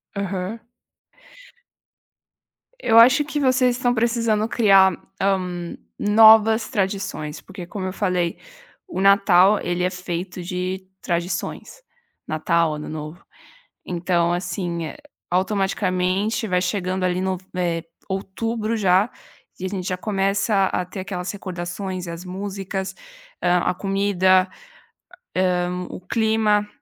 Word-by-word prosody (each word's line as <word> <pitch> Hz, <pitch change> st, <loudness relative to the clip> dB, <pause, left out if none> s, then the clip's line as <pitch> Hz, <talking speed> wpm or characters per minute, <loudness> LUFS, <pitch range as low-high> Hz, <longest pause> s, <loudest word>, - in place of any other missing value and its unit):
Aham. 200 Hz, +2 st, -3 dB, 2.2 s
Eu 225 Hz, -, +3 dB
acho 255 Hz, +6 st, +7 dB
que 295 Hz, 0 st, -3 dB
vocês 255 Hz, -2 st, +3 dB
estão 245 Hz, -1 st, +1 dB
precisando 230 Hz, -2 st, +1 dB
criar, 195 Hz, -5 st, +5 dB, 0.3 s
hã, 180 Hz, -3 st, -1 dB, 0.2 s
novas 220 Hz, +1 st, +6 dB
tradições, 190 Hz, -6 st, -2 dB
porque 185 Hz, -2 st, -9 dB
como 190 Hz, 0 st, -5 dB
eu 185 Hz, -, -4 dB
falei, 180 Hz, -4 st, 0 dB, 0.5 s
o 335 Hz, -, -5 dB
Natal 195 Hz, 0 st, +5 dB
ele 175 Hz, 0 st, -2 dB
é 180 Hz, -, +2 dB
feito 180 Hz, 0 st, -5 dB
de 185 Hz, +1 st, -4 dB
tradições. 180 Hz, -, -3 dB, 0.5 s
Natal, 160 Hz, +1 st, +1 dB
Ano 150 Hz, -, -7 dB
Novo, 155 Hz, +2 st, -7 dB, 0.6 s
então 175 Hz, -1 st, 0 dB
assim, 175 Hz, -1 st, -3 dB
eh, -, -, -7 dB, 0.3 s
automaticamente 190 Hz, +2 st, 0 dB
vai 180 Hz, -2 st, +1 dB
chegando 185 Hz, 0 st, -1 dB
ali 180 Hz, 0 st, 0 dB
no 190 Hz, -1 st, -1 dB, 0.2 s
eh, 170 Hz, -2 st, -1 dB, 0.3 s
outubro 215 Hz, +4 st, -2 dB
já, 195 Hz, 0 st, +3 dB, 0.5 s
e 185 Hz, -, -4 dB
a -, -, 0 dB
gente 185 Hz, -2 st, -4 dB
já 185 Hz, -, -1 dB
começa 195 Hz, +1 st, +1 dB
a 185 Hz, -, -1 dB
ter 185 Hz, +2 st, -7 dB
aquelas 180 Hz, -1 st, -4 dB
recordações 185 Hz, -1 st, -5 dB
e -, -, -7 dB
as 170 Hz, +2 st, -7 dB
músicas, 190 Hz, 0 st, -4 dB, 0.5 s
hã, 180 Hz, 0 st, +3 dB
a -, -, 0 dB
comida, 190 Hz, -1 st, +2 dB, 1.0 s
hã, 180 Hz, 0 st, -1 dB
o -, -, -7 dB
clima, 215 Hz, +1 st, +1 dB
190 Hz, 120 wpm, -22 LUFS, 180-210 Hz, 2.2 s, acho